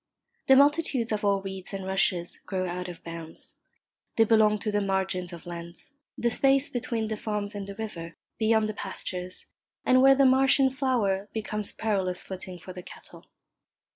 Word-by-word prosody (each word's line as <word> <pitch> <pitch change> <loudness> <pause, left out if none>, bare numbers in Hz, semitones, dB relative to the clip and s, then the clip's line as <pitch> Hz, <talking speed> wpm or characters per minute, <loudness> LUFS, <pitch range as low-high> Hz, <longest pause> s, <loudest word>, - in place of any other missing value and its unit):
The 265 - +8
multitudes 280 -4 +3
of 215 -1 -1
all 200 -1 +2
reeds 190 0 -5
and 195 -1 -5
rushes 190 -2 0
grow 185 -1 -1
out 180 +1 -4
of 175 -2 -9
bounds. 165 -1 -7 0.6
They 225 - +6
belong 215 -1 +4
to 215 - -1
the 205 0 +1
margins 190 -2 -1
of 170 -2 -9
lands, 170 +6 -6 0.2
the 235 - +1
space 270 +3 +4
between 235 -3 -2
the 215 - -2
farms 210 -1 -3
and 200 -1 -5
the 200 - -7
river, 175 -7 -6 0.2
beyond 220 -1 +3
the 215 - -3
pastures, 180 -3 -5 0.4
and 255 0 +5
where 270 +1 +7
the 275 0 +5
marsh 265 +2 +5
in 265 -1 +4
flower 220 -7 0
becomes 210 -1 -3
perilous 190 -5 -1
footing 185 -1 -7
for 185 +2 -10
the 180 - -7
cattle. - - -13
205 Hz, 175 wpm, -27 LUFS, 185-230 Hz, 0.6 s, The